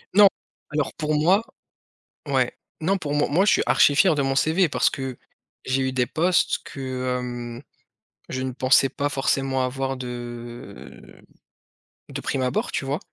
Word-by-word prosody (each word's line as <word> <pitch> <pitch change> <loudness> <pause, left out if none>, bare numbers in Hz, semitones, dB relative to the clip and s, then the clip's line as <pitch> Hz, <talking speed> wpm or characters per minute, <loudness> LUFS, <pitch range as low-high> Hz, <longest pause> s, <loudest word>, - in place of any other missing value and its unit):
Non, 205 -1 +9 0.4
alors 150 -1 -1
pour 155 -1 -1
moi 175 +7 +4 0.9
ouais - - +1 0.3
non 195 +5 +2
pour 145 -5 -4
moi 145 0 +2
moi 180 +7 +3
je - - +5
suis - - +3
archi 145 - +4
fier 170 +1 +5
de 145 - +1
mon 135 0 0
CV. 160 +6 +3
Parce - - +2
que 130 -2 -5 0.5
j'ai 130 +1 +1
eu 130 - 0
des 125 -1 +2
postes 175 +2 +2
que, 130 -2 -3
hem, 120 0 -6 0.7
je 130 0 -3
ne 130 - -3
pensais 130 +1 +4
pas 145 - -1
forcément 135 -1 0
avoir 135 +1 -2
de 120 -1 -9 0.9
de - - -5
prime 135 - -2
abord. 125 -1 -1
Tu - - -2
vois? 140 +5 -1
135 Hz, 165 wpm, -24 LUFS, 130-150 Hz, 0.9 s, Non